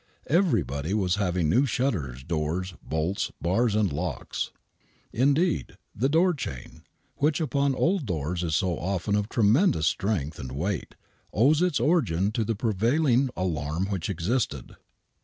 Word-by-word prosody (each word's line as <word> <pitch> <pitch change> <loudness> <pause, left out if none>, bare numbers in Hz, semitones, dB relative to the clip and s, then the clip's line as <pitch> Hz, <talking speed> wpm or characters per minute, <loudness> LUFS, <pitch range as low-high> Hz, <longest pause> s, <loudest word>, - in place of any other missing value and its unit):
Everybody 100 - +1
was 95 -2 +1
having 90 -4 +1
new 125 - +3
shutters, 85 - -1
doors, 85 +4 -2
bolts, 80 +5 -2
bars 105 +6 +1
and 105 -7 +1
locks. 80 -4 -3 0.6
Indeed, 140 - +1 0.2
the 130 +6 +1
door 175 +4 +4
ohain, 70 - -7 0.4
which 150 +2 +2
upon 140 -3 +1
old 170 - +1
doors 85 0 -2
is 80 -3 0
so 90 -1 0
often 95 +3 -1
of 105 +1 -1
tremendous 115 - +3
strength 80 -5 -1
and 65 -1 -6
weight, 85 +5 -3 0.4
owes 140 - +3
its 180 -5 +2
origin 105 - +2
to 110 - 0
the 110 +1 -1
prevailing 120 +6 +2
alarm 85 +2 -2
which 95 -1 -2
existed. 90 - -2
100 Hz, 140 wpm, -26 LUFS, 80-130 Hz, 0.6 s, door